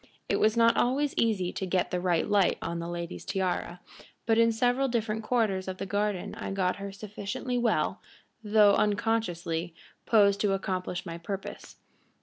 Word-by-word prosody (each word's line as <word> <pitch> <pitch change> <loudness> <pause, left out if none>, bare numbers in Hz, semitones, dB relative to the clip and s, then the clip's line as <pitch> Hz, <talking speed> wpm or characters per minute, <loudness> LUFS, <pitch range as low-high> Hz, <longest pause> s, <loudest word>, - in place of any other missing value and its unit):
It - - +1
was 215 +2 +3
not 230 0 +5
always 275 +4 +1
easy 195 -6 +1
to 190 - -3
get 185 0 0
the 180 -1 -1
right 175 -3 +1
light 205 -3 +3
on 170 0 -4
the 170 - -4
lady's 170 0 -5
tiara, 180 -2 -2 0.4
but 225 0 +3
in 230 0 +5
several 245 +4 +1
different 220 -3 -1
quarters 215 -5 0
of 185 0 -4
the - - -4
garden 205 -1 -2
I - - -6
got 190 -2 0
her 200 0 -6
sufficiently 210 +5 -4
well, 235 -2 0 0.4
though 210 -1 +5
unconsciously, 180 -7 0 0.3
posed 200 -2 +4
to 205 -2 +2
accomplish 185 -2 -3
my 170 -1 -6
purpose. 195 +3 -7
200 Hz, 165 wpm, -28 LUFS, 185-225 Hz, 0.4 s, not